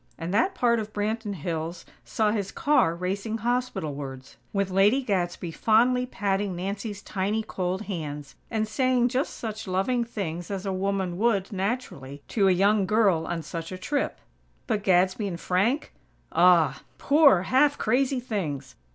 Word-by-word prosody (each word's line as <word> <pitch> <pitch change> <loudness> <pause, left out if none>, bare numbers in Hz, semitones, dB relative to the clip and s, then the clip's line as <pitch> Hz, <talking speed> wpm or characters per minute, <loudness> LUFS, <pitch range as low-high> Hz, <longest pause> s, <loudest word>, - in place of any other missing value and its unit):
and 170 +2 -4
that 375 - +2
part 235 -1 +2
of 215 0 -6
Branton 210 0 -2
Hills 165 +1 -4 0.2
saw 215 -1 0
his 205 -3 -2
car 285 - +2
racing 195 +5 -3
hospitalwards, 145 - -3 0.2
with 195 -2 -1
Lady 205 +8 +4
Gadsby 175 -5 -2
fondly 245 +8 +3
patting 200 -4 -1
Nancy's 200 +3 -4
tiny, 205 +3 -1
cold 185 0 -3
hands, 150 -8 -6 0.2
and 220 -1 -1
saying 250 +1 +2
just 260 +3 -2
such 220 -2 -5
loving 195 +7 +1
things 175 -7 -5
as 195 -1 -4
a 195 - -1
woman 190 -2 -1
would, 210 -4 +1
naturally, 185 - -4
to 200 -4 +2
a - - +5
young 195 +2 +3
girl 195 -6 +2
on 170 -2 -3
such 165 +1 -6
a 185 - -5
trip. 285 +10 -2 0.5
But 215 -4 -1
Gadsby 185 +2 +2
and 170 -3 -5
Frank? 205 - 0 0.4
Ah! 170 -1 +4 0.2
Poor, 280 - +5
half 280 +7 +3
crazy 255 +3 +1
things! 175 - -4
200 Hz, 150 wpm, -26 LUFS, 180-225 Hz, 0.5 s, a